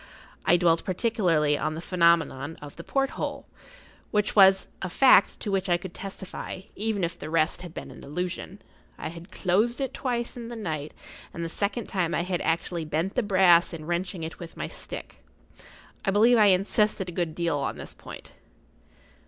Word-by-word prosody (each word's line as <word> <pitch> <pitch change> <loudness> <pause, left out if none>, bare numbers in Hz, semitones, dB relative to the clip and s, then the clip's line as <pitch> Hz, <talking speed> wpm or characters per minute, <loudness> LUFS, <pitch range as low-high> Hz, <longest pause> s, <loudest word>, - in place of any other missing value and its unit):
I 175 - +5
dwelt 170 -1 +3
particularly 180 -7 +1
on 155 0 -1
the - - -5
phenomenon 170 -4 +2
of 145 -1 -10
the 170 - -9
porthole, 270 +5 -2 0.6
which 210 0 0
was 195 -1 +7 0.2
a 190 - -3
fact 255 -1 +5
to 205 - -3
which 195 -1 0
I 175 - +4
could 175 0 -9
testify, 195 -1 -7
even 210 -2 -1
if 170 +1 -2
the 155 - -6
rest 160 +1 +1
had 175 -2 -8
been - - -8
an - - -12
illusion. 180 +6 -5 0.3
I - - -5
had 170 +3 -10
closed 215 +7 +1
it 270 -1 -2
twice 240 -3 -2
in 235 -2 -7
the 240 - -6
night, 155 -9 -4 0.4
and 170 - -3
the - - -4
second 205 +6 -2
time 180 -4 -1
I 170 - 0
had 180 -1 -2
actually 165 +1 -1
bent 160 +6 -1
the 250 - +1
brass 185 -5 +5
in 155 -2 -7
wrenching 175 +1 -2
it 160 - -6
with 170 -1 -9
my - - -3
stick. - - -8 0.8
I - - 0
believe 225 +4 +5
I 210 - +7
insisted 195 +1 +2
a - - -5
good 170 -3 -2
deal 170 -4 0
on 140 - -3
this - - -7
point. - - -11
180 Hz, 185 wpm, -26 LUFS, 165-205 Hz, 0.8 s, was